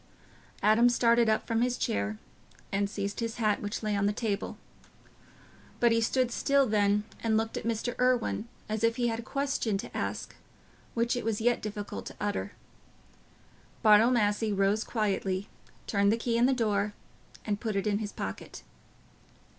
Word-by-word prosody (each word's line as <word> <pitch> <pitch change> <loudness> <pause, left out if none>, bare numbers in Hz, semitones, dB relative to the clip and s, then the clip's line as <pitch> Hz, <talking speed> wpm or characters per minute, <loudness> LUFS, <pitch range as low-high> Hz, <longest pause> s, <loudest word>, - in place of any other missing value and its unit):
Adam 225 +3 +5
started 235 -1 +3
up 220 - +1
from 230 0 0
his 245 0 +1
chair 100 +1 -1 0.5
and 200 0 0
seized 200 0 -4
his 230 -1 -2
hat, 215 -3 +1
which 205 +2 -4
lay 210 -1 0
on 200 0 +2
the - - +2
table. 210 -2 -3 1.2
But 235 -1 +4
he 230 0 +3
stood 250 +2 +1
still 275 +3 +3
then, 210 -2 +2 0.2
and 220 -1 +2
looked 225 0 -1
at - - -4
Mr. 230 +1 -1
Irwine, 250 -3 +1 0.2
as 215 +1 -3
if 230 0 +3
he 240 -1 +1
had 225 0 -2
a - - -3
question 275 -5 -1
to 210 - -8
ask - - -3 0.6
which 235 +1 +1
it 245 - -3
was 220 -2 -1
yet 240 +2 +2
difficult 205 -1 -5
to - - -8
utter. 205 0 -2 1.3
Bartle 215 +2 +7
Massey 215 -2 +1
rose 200 +2 +2
quietly, 200 -3 -1 0.4
turned 200 -1 +2
the 225 - +2
key 230 0 -1
in 235 +2 +4
the - - +3
door, 210 -4 0 0.5
and 205 -1 -1
put 220 -3 -2
it 195 - 0
in 205 -1 +1
his 210 -2 -4
pocket. 95 -8 -6
220 Hz, 170 wpm, -29 LUFS, 205-235 Hz, 1.3 s, Bartle